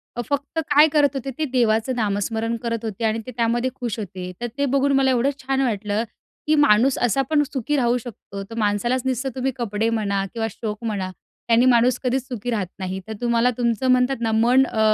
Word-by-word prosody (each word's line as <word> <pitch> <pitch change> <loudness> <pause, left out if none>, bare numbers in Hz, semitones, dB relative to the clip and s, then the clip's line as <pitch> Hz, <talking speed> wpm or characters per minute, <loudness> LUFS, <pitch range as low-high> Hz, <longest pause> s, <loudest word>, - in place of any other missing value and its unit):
अ, 240 - -2
फक्त 285 +3 -2
काय 300 +2 +7
करत 295 -2 +4
होते 270 0 -3
ते 315 - 0
देवाचं 235 0 +2
नामस्मरण 220 +1 -1
करत 230 -1 -2
होते 220 0 -5
आणि 220 +1 +1
ते - - -5
त्यामध्ये 240 +2 +1
खुश 240 -5 -4
होते. 185 -3 -6
तर 240 - -1
ते 280 - +1
बघून 275 +1 +2
मला 265 -1 +3
एवढं 255 +2 +2
छान 270 0 0
वाटलं 210 -3 -1 0.4
की 310 - +4
माणूस 260 -2 +4
असा 245 +3 +2
पण 305 -2 +3
सुखी 270 +2 -1
राहू 245 -2 +2
शकतो. 220 -4 -8
तर 225 +3 -10
माणसालाच 220 +4 +1
नसतं 260 +1 -1
तुम्ही 265 +1 -1
कपडे 225 -2 -1
म्हणा 200 -3 0
किंवा 225 -1 -1
शोक 215 +1 -6
म्हणा 200 -4 -2 0.4
त्याने 235 +2 +5
माणूस 245 0 +4
कधीचं 255 0 0
सुखी 235 +2 -5
राहत 205 -5 -1
नाही. 190 0 -3
तर 220 - -5
तुम्हाला 240 0 +2
तुमचं 240 +1 0
म्हणतात 255 +1 +3
ना 225 -1 0
मन 240 +4 +4
अ, 225 - -4
235 Hz, 205 wpm, -22 LUFS, 220-260 Hz, 0.4 s, काय